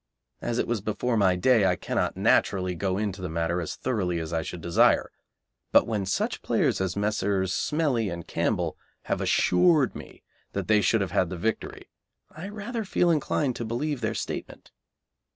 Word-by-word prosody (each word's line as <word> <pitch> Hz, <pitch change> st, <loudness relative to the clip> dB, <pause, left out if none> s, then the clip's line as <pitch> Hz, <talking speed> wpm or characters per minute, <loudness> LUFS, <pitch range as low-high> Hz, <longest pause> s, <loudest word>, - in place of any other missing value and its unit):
As 120 Hz, -, -2 dB
it -, -, +1 dB
was 120 Hz, -3 st, -1 dB
before 115 Hz, +4 st, -1 dB
my 95 Hz, -4 st, +3 dB
day 110 Hz, +1 st, +4 dB
I 90 Hz, -, +2 dB
cannot, -, -, -2 dB
naturally, 95 Hz, -2 st, +2 dB
go 95 Hz, +2 st, -1 dB
into 100 Hz, -2 st, -3 dB
the 90 Hz, -, -4 dB
matter 85 Hz, +2 st, -1 dB
as 80 Hz, -, -4 dB
thoroughly 95 Hz, -9 st, -1 dB
as 80 Hz, 0 st, -4 dB
I 80 Hz, -, +1 dB
should 85 Hz, +2 st, -6 dB
desire, 85 Hz, 0 st, +3 dB, 0.6 s
but -, -, +6 dB
when 105 Hz, -4 st, -2 dB
such 95 Hz, -, -1 dB
players -, -, +1 dB
as 95 Hz, -1 st, -1 dB
Messrs. 100 Hz, -2 st, 0 dB
Smellie 145 Hz, -9 st, 0 dB
and 85 Hz, -1 st, -6 dB
Campbell -, -, -1 dB, 0.2 s
have -, -, -2 dB
assured 145 Hz, -, +3 dB
me -, -, -11 dB, 0.3 s
that -, -, -3 dB
they 105 Hz, -1 st, +4 dB
should 100 Hz, +3 st, +2 dB
have 95 Hz, -4 st, -2 dB
had 90 Hz, -3 st, +1 dB
the 90 Hz, -, -5 dB
victory, 110 Hz, +6 st, -3 dB, 0.4 s
I 170 Hz, +6 st, -8 dB
rather 220 Hz, +3 st, -4 dB
feel 175 Hz, -3 st, +2 dB
inclined 145 Hz, -4 st, 0 dB
to -, -, -3 dB
believe 125 Hz, +5 st, -2 dB
their 110 Hz, 0 st, -1 dB
statement. -, -, -6 dB
105 Hz, 180 wpm, -26 LUFS, 90-125 Hz, 0.6 s, but